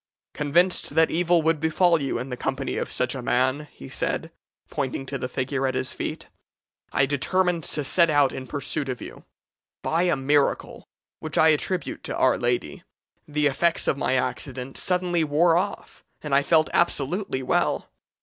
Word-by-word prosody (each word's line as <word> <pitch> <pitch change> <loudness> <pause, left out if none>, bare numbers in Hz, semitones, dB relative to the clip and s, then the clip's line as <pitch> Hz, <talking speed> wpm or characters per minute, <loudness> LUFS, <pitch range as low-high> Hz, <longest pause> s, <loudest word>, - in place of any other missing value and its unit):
'Convinced 170 +5 +1
that 160 0 +4
evil 170 0 +2
would 160 -1 +2
befall 160 +1 +3
you 135 - -1
in 130 - -5
the 125 - -3
company 135 +2 -3
of - - -3
such 125 -1 -1
a 130 - -5
man,' 130 +5 +1
he 70 - -11
said, - - -2 0.4
pointing 135 -1 -3
to 140 - -6
the 125 - -3
figure 130 +1 -1
at 130 - -2
his 130 0 -2
feet, - - -5 0.7
'I 135 - +3
determined 170 +5 0
to 150 - -2
set 170 +4 +4
out 145 -3 +4
in 130 -1 -7
pursuit 140 +1 -2
of 125 - -3
you. - - -10 0.6
By 165 +2 +1
a 175 - +3
miracle, 140 +1 0 0.3
which 155 - -4
I 160 - +6
attribute 170 +4 -1
to - - -4
Our 130 - +3
Lady, 120 -11 -1 0.4
the 150 0 0
effects 165 +4 +1
of - - +2
my 130 -1 0
accident 130 +1 -3
suddenly 180 -2 +1
wore 160 +3 +3
off, 195 +4 -3 0.2
and 150 -2 -3
I 140 - +5
felt 155 +2 +3
absolutely 150 -2 0
well. - - 0
145 Hz, 175 wpm, -25 LUFS, 130-165 Hz, 0.7 s, I